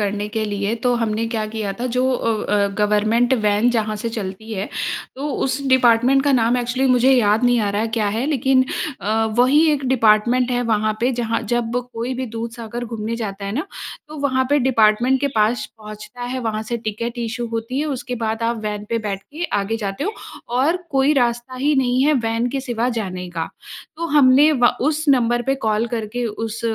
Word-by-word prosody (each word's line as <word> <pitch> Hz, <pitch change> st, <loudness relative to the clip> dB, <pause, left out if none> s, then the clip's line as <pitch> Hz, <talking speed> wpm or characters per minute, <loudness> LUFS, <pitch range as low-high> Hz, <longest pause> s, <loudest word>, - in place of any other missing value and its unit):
करने 205 Hz, 0 st, -1 dB
के 220 Hz, -1 st, 0 dB
लिए 205 Hz, +1 st, -1 dB
तो 245 Hz, -1 st, +2 dB
हमने 225 Hz, -1 st, -1 dB
क्या 220 Hz, -2 st, -2 dB
किया 210 Hz, -3 st, -2 dB
था 250 Hz, -, -1 dB
जो 255 Hz, +1 st, +2 dB
अ, 230 Hz, -3 st, -1 dB
अ, 200 Hz, -1 st, +3 dB
गवर्नमेंट 215 Hz, +4 st, +2 dB
वैन 210 Hz, +3 st, +3 dB
जहाँ 215 Hz, -2 st, -1 dB
से 230 Hz, -, -1 dB
चलती 220 Hz, 0 st, -6 dB
है। 200 Hz, -1 st, -3 dB, 0.5 s
तो 290 Hz, +2 st, -3 dB, 0.2 s
उस 270 Hz, +1 st, -1 dB
डिपार्टमेंट 255 Hz, +1 st, +4 dB
का 285 Hz, -, +3 dB
नाम 240 Hz, 0 st, +3 dB
एक्चुअली 250 Hz, +2 st, 0 dB
मुझे 250 Hz, +1 st, +4 dB
याद 225 Hz, -1 st, +3 dB
नहीं 245 Hz, -1 st, +4 dB
आ 205 Hz, -1 st, 0 dB
रहा 210 Hz, +3 st, 0 dB
क्या 215 Hz, -2 st, +1 dB
है 225 Hz, +5 st, -1 dB
लेकिन 265 Hz, -3 st, +2 dB, 0.4 s
अ, 220 Hz, +4 st, +1 dB
वही 260 Hz, +5 st, +5 dB
एक 280 Hz, -2 st, -2 dB
डिपार्टमेंट 240 Hz, +1 st, +3 dB
है 245 Hz, 0 st, +1 dB
वहाँ 215 Hz, -2 st, +1 dB
पे 245 Hz, +2 st, +2 dB
जहाँ 230 Hz, -1 st, -1 dB
जब 235 Hz, -1 st, -1 dB, 0.2 s
कोई 235 Hz, +3 st, -3 dB
भी 260 Hz, +1 st, -3 dB
दूधसागर 230 Hz, +1 st, -6 dB
घूमने 225 Hz, 0 st, -4 dB
जाता 200 Hz, -3 st, -5 dB
है 200 Hz, -, -3 dB
ना? 300 Hz, -, -2 dB, 0.4 s
तो 305 Hz, -, -9 dB
वहाँ 260 Hz, -2 st, +1 dB
पे 290 Hz, -, +4 dB
डिपार्टमेंट 245 Hz, +1 st, +3 dB
के 280 Hz, -, +1 dB
पास 215 Hz, 0 st, +1 dB
पहुँचता 215 Hz, +3 st, -10 dB
है 250 Hz, +2 st, -3 dB
वहाँ 220 Hz, -2 st, -2 dB
से 235 Hz, +2 st, -3 dB
टिकट 230 Hz, +3 st, -3 dB
इश्यू 235 Hz, +1 st, -3 dB
होती 230 Hz, +4 st, -3 dB
है 305 Hz, -, 0 dB
उसके 270 Hz, -2 st, -4 dB
बाद 220 Hz, +1 st, -2 dB
आप 230 Hz, 0 st, 0 dB
वैन 210 Hz, -1 st, -3 dB
पर 230 Hz, -, +1 dB
बैठ 195 Hz, -1 st, -4 dB
के 320 Hz, +4 st, -6 dB, 0.2 s
आगे 220 Hz, +3 st, -2 dB
जाते 205 Hz, +5 st, -4 dB
हो 420 Hz, -, -1 dB, 0.5 s
और 320 Hz, +6 st, +2 dB
कोई 275 Hz, +2 st, +3 dB
रास्ता 240 Hz, -1 st, 0 dB
ही 290 Hz, +3 st, +1 dB
नहीं 255 Hz, -1 st, +2 dB
है 305 Hz, -, +4 dB
वैन 230 Hz, +2 st, 0 dB
के 270 Hz, +1 st, -2 dB
सिवा 240 Hz, -2 st, -1 dB
जाने 185 Hz, -6 st, -4 dB
का। 165 Hz, -1 st, -3 dB, 0.5 s
तो 335 Hz, 0 st, -3 dB
हमने 290 Hz, 0 st, +5 dB
व 245 Hz, -4 st, +3 dB, 0.3 s
उस 310 Hz, +2 st, -3 dB
नंबर 240 Hz, -2 st, +3 dB
पे 270 Hz, +2 st, 0 dB
कॉल 220 Hz, +1 st, +1 dB
करके 235 Hz, +1 st, -3 dB
उस 225 Hz, +1 st, -5 dB
235 Hz, 205 wpm, -20 LUFS, 215-255 Hz, 0.5 s, वही